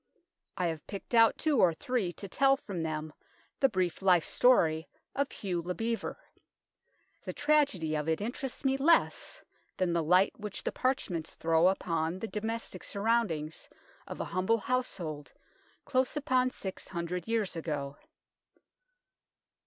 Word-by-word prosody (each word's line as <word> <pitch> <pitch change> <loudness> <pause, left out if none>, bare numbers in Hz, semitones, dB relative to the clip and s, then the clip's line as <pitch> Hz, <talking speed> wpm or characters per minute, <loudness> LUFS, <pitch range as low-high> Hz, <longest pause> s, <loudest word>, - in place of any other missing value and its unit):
I 180 - 0
have 160 -2 -3
picked 200 +4 -7
out 230 -1 +6
two 300 -5 +2
or 170 -5 +5
three 230 -3 -1
to 200 - -6
tell 270 +7 +3
from 195 - -5
them 155 -1 -3 0.5
the 270 - +5
brief 185 -4 -1
life 180 -4 +4
story 165 -11 +3 0.2
of 280 0 -1
Hugh 180 -4 -3
le 180 +2 -4
Bevere. 230 0 -2 1.1
The - - -5
tragedy 285 - +2
of 150 +1 -1
it 160 - +1
interests 245 +5 -4
me 270 0 +3
less 325 +5 +2 0.3
than 180 -2 +1
the 170 - +2
light 180 +5 +4
which 210 -2 -5
the - - -1
parchments 185 -11 -2
throw 165 +1 +3
upon 165 -2 0
the 225 - -4
domestic 220 +2 -4
sur 200 - -5
roundings 180 -10 0 0.4
of - - -7
a - - -2
humble 190 +5 +1
household 190 - -3 0.5
close 260 +1 +1
upon 260 -3 +2
six 190 -6 -6
hundred 170 0 -4
years 225 -5 0
ago. 145 -4 -3
190 Hz, 145 wpm, -31 LUFS, 165-245 Hz, 1.1 s, out